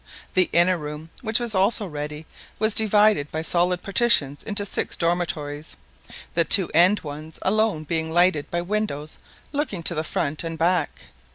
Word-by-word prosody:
The 185 -1 +2
inner 175 +1 +3
room, 150 +2 -8
which 220 0 0
was 240 -2 +1
also 205 +3 +2
ready, 150 -2 -7 0.3
was 215 0 +2
divided 210 -7 +3
by 160 0 -3
solid 180 +1 0
partitions 190 - +2
into 205 -1 0
six - - -2
dormitories, 160 -3 -3 0.6
the 170 - +3
two 180 +2 +6
end 180 +6 +4
ones 155 +1 -9
alone 210 -5 0
being 160 +1 -3
lighted 175 -3 +2
by 175 0 -2
windows 175 -7 -3 0.3
looking 280 - -3
to 170 - +1
the 155 -1 -2
front 150 0 -3
and 165 -1 -5
back. 175 +3 0
175 Hz, 160 wpm, -23 LUFS, 155-205 Hz, 0.6 s, two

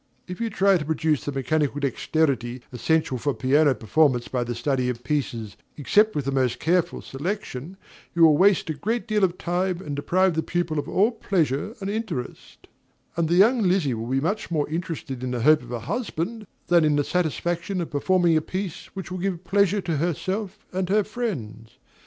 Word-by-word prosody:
If 180 +4 -7
you 230 - 0
try 195 -2 +3
to - - -3
produce 155 -1 0
the 145 - -2
mechanical 145 +1 0
dexterity 130 -3 -1
essential 150 0 0
for 145 +2 -1
piano 140 +1 +3
performance 120 +3 +2
by 125 -2 -1
the 120 0 -4
study 130 -2 0
of 120 -1 -4
pieces, 120 -7 -3 0.2
except 210 +9 +3
with 145 -3 -1
the 140 - 0
most 130 -3 0
careful 175 +1 0
selection, 170 +1 -5 0.4
you 170 - +4
will 155 -2 +7
waste 195 +4 +4
a - - -1
great 220 - -2
deal 215 -2 +1
of 185 -1 +2
time 180 0 -1
and 150 -6 -5
deprive 180 +6 +2
the 160 - 0
pupil 170 -2 -1
of - - -4
all 210 +5 +3
pleasure 185 - -1
and 195 +1 -2
interest; 205 - -5 0.5
and 165 -1 0
the 170 - +3
young 225 +6 +5
Lizzie 180 - +2
will 115 0 -4
be 135 +1 +1
much 185 +9 -2
more 155 -4 0
interested 160 -6 -4
in 130 - -2
the 125 -1 -2
hope 155 +2 +6
of 120 0 -11
a 120 -2 -3
husband 215 - -3 0.2
than 175 -1 +4
in 150 -1 +3
the 145 - +2
satisfaction 175 +3 -1
of 170 - -4
performing 170 +3 +2
a 155 - +3
piece 185 +1 -5
which 190 -2 -6
will 185 - -4
give 185 -1 -2
pleasure 200 +2 +2
to 170 -4 -2
herself 190 +6 -3
and 185 -1 -1
her 210 +2 +3
friends. 135 - -5
160 Hz, 195 wpm, -24 LUFS, 140-190 Hz, 0.5 s, will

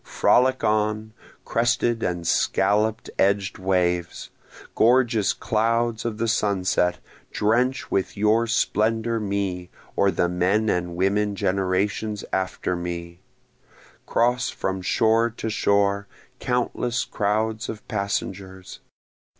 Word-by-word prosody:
Frolic 130 +1 +2
on, 110 0 0 0.3
crested 120 0 +1
and 85 -1 -2
scallop 105 +6 +1 0.2
edg'd 100 0 +1
waves! 90 -2 -1 0.4
Gorgeous 120 -3 +3
clouds 115 +1 0
of 115 -2 -2
the 115 +1 -1
sunset! 95 -5 +1 0.3
drench 125 +5 0
with 95 - -1
your 110 +3 +2
splendor 115 0 +1
me, 100 -4 -3 0.3
or 100 - +3
the 90 -1 +1
men 95 +5 +1
and 85 -1 -2
women 100 +3 +1
generations 100 +3 -1
after 95 -1 -1
me! 85 0 -6 0.9
Cross 120 +1 +1
from 95 0 -3
shore 115 +5 +2
to 110 - -3
shore, 100 -1 +1 0.3
countless 125 -1 -1
crowds 110 +3 -1
of 110 - -7
passengers! 95 -2 -4
105 Hz, 105 wpm, -24 LUFS, 95-115 Hz, 0.9 s, Gorgeous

